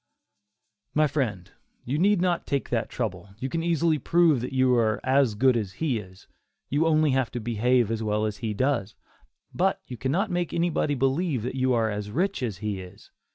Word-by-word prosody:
My 155 0 +4
friend, 125 - -2 0.3
you 140 +5 -1
need 200 0 +3
not 180 -2 0
take 140 -1 -1
that - - -1
trouble, 100 - -4
you 130 +4 -4
can 165 +4 -2
easily 165 -2 +1
prove 165 -3 +3
that 125 - -4
you 130 -1 +3
are 110 -3 +2
"as 130 -4 +3
good 130 +3 +4
as 105 -5 -2
he 135 -2 -1
is"; 95 -2 -13 0.5
you 145 +4 +2
have 165 - +3
only 155 -1 +3
to 120 0 -6
behave 120 +1 +1
as 115 -1 -2
well 105 0 0
as 105 -1 -3
he 110 -3 -3
does, 120 -4 0 0.6
but 190 +2 +1
you 125 - -8
cannot 170 - 0
make 175 -2 -1
anybody 165 -3 +1
believe 135 - 0
that 125 - -3
you 130 -1 +1
are 115 -2 +1
as 105 0 -4
rich 185 - -1
as 110 -7 -2
he 105 -2 -2
is. 90 -1 -14
130 Hz, 200 wpm, -26 LUFS, 110-155 Hz, 0.6 s, My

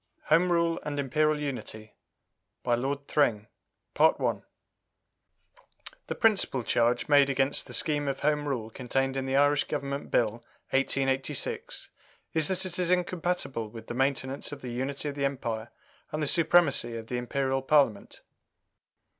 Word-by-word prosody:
] - - -41
HOME 180 +2 +5
RULE 170 -1 +2
AND 145 -1 -4
IMPERIAL 150 +2 +1
UNITY 125 -6 -6 0.7
BY 120 - +1
LORD 140 +4 -2
THRING 115 -8 +2 0.5
The - - +2 1.7
principal 205 - +2
charge 120 +1 +1
made 145 -2 +5
against 135 +1 +1
the - - -5
scheme 145 -3 0
of 135 -1 -2
Home 150 0 +1
Rule 115 -5 -3
contained 135 +2 -1
in 135 0 -2
the 135 - 0
Irish 145 +1 +4
Government 140 -1 -4
Bill, 115 0 +1 0.3
1886, 135 0 -1 0.4
is 160 -2 +2
that 190 0 0
it 185 -1 -2
is 180 -1 +1
incompatible 175 -9 -1
with 115 +1 -10
the - - -6
maintenance 135 +1 -1
of 145 - -8
the 125 - -5
unity 135 +4 -2
of 145 - -3
the 140 0 -1
Empire 115 -5 -3 0.4
and 155 0 -2
the - - -1
supremacy 160 -7 +3
of 115 - -7
the 125 +2 -3
Imperial 135 +2 -1
Parliament. 135 -7 +1
140 Hz, 145 wpm, -28 LUFS, 125-150 Hz, 1.7 s, HOME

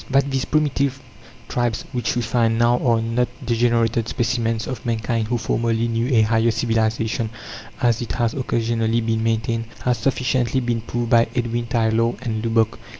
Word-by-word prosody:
That 140 +1 +2
these 135 -1 0
primitive 140 -3 0 0.5
tribes 120 -2 -1
which 125 -2 -1
we 120 - 0
find 115 0 +1
now 120 +1 +3
are 115 -3 +2
not 120 +2 0 0.2
degenerated 115 -1 +1
specimens 115 -2 -1
of 130 - -5
mankind 115 -1 -1
who 120 +1 0
formerly 115 0 0
knew 115 +1 0
a 110 - +6
higher 115 +1 +2
civilization, 115 0 0 0.5
as 120 -2 +2
it 120 - -4
has 120 -2 0
occasionally 115 -3 0
been 110 0 0
maintained, 115 0 0 0.2
has 125 -2 +1
sufficiently 130 0 +1
been 120 -2 -1
proved 120 +1 -3
by 115 0 +5
Edwin 120 -1 -1
Tylor 115 0 +1
and 110 -3 -2
Lubbock. 115 -1 +1
115 Hz, 160 wpm, -21 LUFS, 115-120 Hz, 0.5 s, a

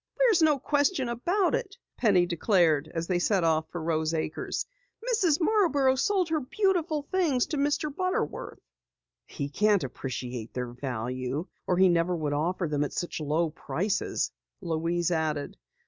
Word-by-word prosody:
"There's 460 -8 +4
no 305 -2 +4
question 285 0 +1
about 350 - +1
it," - - -2 0.2
Penny 195 -6 +3
declared 170 -4 +2
as 165 -1 -3
they 180 0 0
set 190 0 +2
off 160 -1 +1
for 175 - -5
Rose 160 0 0
Acres. 155 0 -3 0.4
"Mrs. 385 -11 +2
Marborough 320 -9 +3
sold 370 +6 +1
her 315 -1 +1
beautiful 330 0 0
things 320 -10 +2
to 305 - -3
Mr. 290 +1 0
Butterworth." 370 0 -2 0.7
"He 140 - -4
can't 205 +4 +2
appreciate 125 -3 -5
their 125 -1 -3
value 125 +3 -3 0.2
or 180 - +2
he 190 +1 +6
never 175 0 +2
would 150 -3 -2
offer 170 +4 0
them 145 -1 0
at 145 - -4
such 175 - -3
low 155 +2 0
prices," 190 +5 -2 0.3
Louise 170 -1 -1
added. 155 -3 -1
180 Hz, 150 wpm, -28 LUFS, -, 0.7 s, he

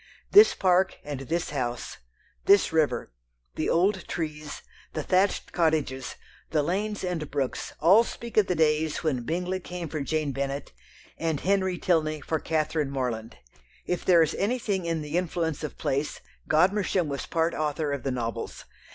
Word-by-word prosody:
This 420 +2 +8
park 185 0 +2
and 145 -2 -5
this 165 +5 -2
house, 120 -4 -3 0.5
this 200 -4 +5
river, 145 - +1 0.4
the - - -1
old 190 +3 +2
trees, 150 -2 -5 0.3
the 155 - -2
thatched 190 +4 +1
cottages, 155 -6 0 0.3
the 150 -2 +1
lanes 200 +6 -2
and 175 -5 -2
brooks 135 -2 -2
all 190 +8 +6
speak 235 0 -8
of 215 -3 +4
the 180 - 0
days 155 0 +1
when 140 -6 0
Bingley 180 +3 -1
came 175 -1 -6
for 155 -1 -3
Jane 155 0 -1
Bennet, 140 +1 -3 0.5
and 160 -3 -1
Henry 190 -1 +1
Tilney 155 -4 +1
for 160 +2 -2
Catherine 155 -2 0
Morland. 125 -4 -3 0.5
If 180 - -2
there 170 -3 +6
is 160 - -1
anything 200 -5 0
in 165 -2 -1
the 150 +4 0
influence 165 -3 -2
of 150 - -5
place, 140 +3 -1 0.3
Godmersham 185 +1 +3
was 140 -2 -4
part 165 0 +1
author 150 -1 -1
of 140 - -3
the 135 - -2
novels. 115 -3 -4
160 Hz, 160 wpm, -27 LUFS, 145-180 Hz, 0.5 s, This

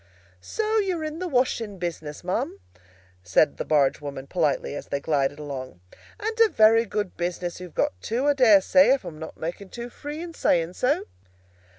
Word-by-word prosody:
"So 435 - 0
you're 370 -6 -1
in 310 +1 -4
the 365 - -2
washing 245 - 0
business, 165 -4 -5
ma'am?" 180 - -2 0.6
said 90 - +2
the - - -2
barge 145 -3 +2
woman 140 -2 -6
politely, 150 -4 0
as - - -6
they 140 - -2
glided 140 -1 0
along. 135 -9 -7 0.4
"And 440 +2 -3
a 455 -1 +6
very 225 - +5
good 205 -2 -3
business 175 0 -3
you've 180 -2 -10
got 90 - 0
too, 240 - -1
I 290 - +4
dare 225 -8 +6
say, 275 +7 +5
if 275 - -9
I'm 155 -2 -8
not 160 - -8
making 175 +4 -5
too 240 +3 -7
free 295 +4 -7
in 340 -1 -8
saying 170 - +1
so." 255 +9 0
185 Hz, 185 wpm, -25 LUFS, -, 0.6 s, a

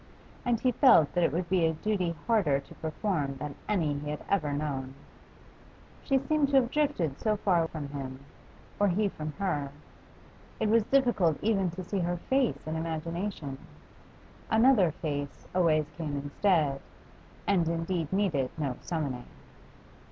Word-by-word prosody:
And 240 -3 +1
he 255 - +2
felt 190 - +5
that 175 - +2
it 165 - +3
would 170 +3 -2
be 185 -1 +2
a 160 0 +3
duty 180 0 -1
harder 190 -12 +3
to 140 - -13
perform 155 -3 -2
than 145 +2 -5 0.2
any 160 -8 +1
he 150 0 -5
had 150 - -5
ever 160 -7 +1
known. 140 -3 -3 1.1
She 275 - +2
seemed 285 +1 +1
to 280 - +1
have 255 -2 +4
drifted 275 - 0
so 215 -1 +1
far 175 -5 +2
from 150 -3 -6
him, 135 -2 -6 0.6
or 205 - +4
he 200 +3 +2
from 155 -4 -6
her. 150 -8 -2 0.9
It 215 - +1
was 225 -1 +4
difficult 235 - +3
even 200 -4 +2
to 180 +2 -6
see 195 +2 -2
her 175 0 0
face 260 +6 0
in 155 0 -3
imagination; 165 -2 -4 0.9
another 225 -5 +5
face 145 -3 -4
always 160 -4 +3
came 150 -4 -3
instead, 145 -1 +1 0.6
and 175 -5 +2
indeed 165 -1 -2
needed 175 -10 +1
no 140 -5 -2
summoning. 145 -8 -3
170 Hz, 150 wpm, -29 LUFS, 150-205 Hz, 1.1 s, felt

